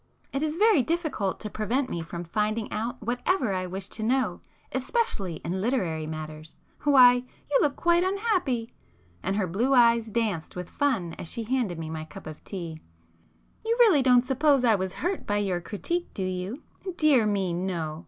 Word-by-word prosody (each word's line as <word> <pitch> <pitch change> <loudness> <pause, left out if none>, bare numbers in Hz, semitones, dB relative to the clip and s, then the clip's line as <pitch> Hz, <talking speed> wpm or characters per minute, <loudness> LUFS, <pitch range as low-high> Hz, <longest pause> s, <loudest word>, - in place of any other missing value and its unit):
It 275 - -1
is 310 0 -1
very 420 -4 +5
difficult 300 - -1
to 215 - -4
prevent 240 +6 0
me 170 - -3
from 170 +1 -6
finding 215 +5 -1
out 225 +3 -3
whatever 245 - 0
I 185 -1 -2
wish 190 +1 -5
to 220 - -6
know, 255 +4 0 0.3
especially 200 - -1
in 185 +3 -2
literary 180 -10 -1
matters! 155 0 -7 0.3
Why, 260 -4 +8
you 255 +3 -2
look 285 -2 +2
quite 345 0 +3
unhappy!" 375 - 0 0.5
and 195 - -1
her 205 -2 +1
blue 230 +10 +1
eyes 235 -2 +5
danced 210 -7 -2
with 180 -1 -6
fun 230 -13 0
as 165 - -5
she 230 - -2
handed 230 -7 -1
me 160 -1 -5
my 155 -1 -5
cup 155 - -11
of 155 -1 -9
tea—"You 155 - -7
really 420 - +6
don't 250 -1 +5
suppose 275 0 +3
I 230 -3 +5
was 190 -2 -1
hurt 360 +3 -3
by 205 - +1
your 190 -4 0
critique, 340 - -3
do 195 - -2
you? 185 +7 -4 0.3
Dear 280 -9 +4
me, 195 -4 0
no! 170 -4 -3
220 Hz, 175 wpm, -27 LUFS, 180-270 Hz, 0.5 s, Why